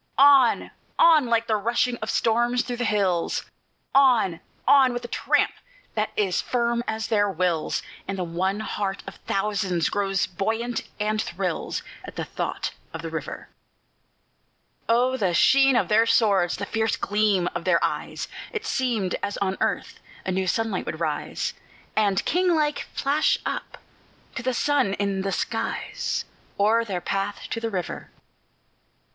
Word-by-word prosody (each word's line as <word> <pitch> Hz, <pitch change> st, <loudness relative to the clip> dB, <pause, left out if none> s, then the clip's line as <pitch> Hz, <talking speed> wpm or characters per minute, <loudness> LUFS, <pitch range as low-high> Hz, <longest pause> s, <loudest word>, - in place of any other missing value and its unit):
On! 275 Hz, -3 st, +6 dB, 0.3 s
on! 315 Hz, -6 st, +6 dB
like 230 Hz, -1 st, +2 dB
the 220 Hz, -, +1 dB
rushing 240 Hz, +3 st, +1 dB
of 220 Hz, 0 st, -5 dB
storms 240 Hz, +2 st, +2 dB
through 245 Hz, -1 st, -4 dB
the 245 Hz, -, -1 dB
hills; 190 Hz, -6 st, +1 dB, 0.5 s
On! 240 Hz, -11 st, +4 dB, 0.3 s
on! 265 Hz, -3 st, +6 dB
with 245 Hz, 0 st, -4 dB
a -, -, -4 dB
tramp -, -, +1 dB, 0.4 s
that 215 Hz, 0 st, 0 dB
is 195 Hz, -4 st, +1 dB
firm 235 Hz, -1 st, 0 dB
as 220 Hz, 0 st, -2 dB
their 205 Hz, -2 st, +2 dB
wills; 175 Hz, -3 st, 0 dB, 0.2 s
And 195 Hz, 0 st, -3 dB
the 185 Hz, -, -1 dB
one 185 Hz, +5 st, -1 dB
heart 200 Hz, -2 st, -3 dB
of -, -, -9 dB
thousands 195 Hz, -4 st, 0 dB
grows 195 Hz, -2 st, +1 dB
buoyant, 225 Hz, +6 st, -2 dB, 0.2 s
and 215 Hz, +1 st, 0 dB
thrills, -, -, -3 dB, 0.2 s
At -, -, -10 dB
the -, -, -3 dB
thought -, -, -3 dB, 0.2 s
of -, -, -6 dB
the -, -, -5 dB
river. -, -, -6 dB, 1.4 s
Oh, 250 Hz, +3 st, +3 dB
the 185 Hz, -7 st, +1 dB
sheen 270 Hz, +4 st, +5 dB
of -, -, +2 dB
their 225 Hz, +2 st, +4 dB
swords! 195 Hz, -7 st, +3 dB
the 205 Hz, -, -3 dB
fierce 220 Hz, +1 st, 0 dB
gleam 205 Hz, -3 st, +1 dB
of 170 Hz, 0 st, -4 dB
their 185 Hz, -2 st, +4 dB
eyes! -, -, -2 dB, 0.2 s
It 440 Hz, -1 st, -4 dB
seemed 235 Hz, -, 0 dB
as 200 Hz, -, -3 dB
on 190 Hz, -1 st, 0 dB
earth -, -, -1 dB, 0.3 s
a 185 Hz, -, -1 dB
new 190 Hz, 0 st, 0 dB
sunlight 225 Hz, -2 st, -1 dB
would 160 Hz, -, -4 dB
rise, 155 Hz, -3 st, -2 dB, 0.4 s
And, 200 Hz, -3 st, +2 dB
king 360 Hz, 0 st, +2 dB
like, 300 Hz, -1 st, 0 dB
flash 290 Hz, +2 st, +2 dB
up -, -, -4 dB, 0.6 s
to -, -, -4 dB
the 255 Hz, 0 st, -1 dB
sun 275 Hz, -7 st, +2 dB
in 200 Hz, -1 st, -1 dB
the 195 Hz, 0 st, -2 dB
skies, -, -, -2 dB, 0.3 s
O'er 220 Hz, +3 st, +4 dB
their 190 Hz, -5 st, -3 dB
path 195 Hz, +3 st, -2 dB
to -, -, -1 dB
the 230 Hz, 0 st, -2 dB
river. 185 Hz, -5 st, -4 dB
215 Hz, 155 wpm, -25 LUFS, 195-245 Hz, 1.4 s, On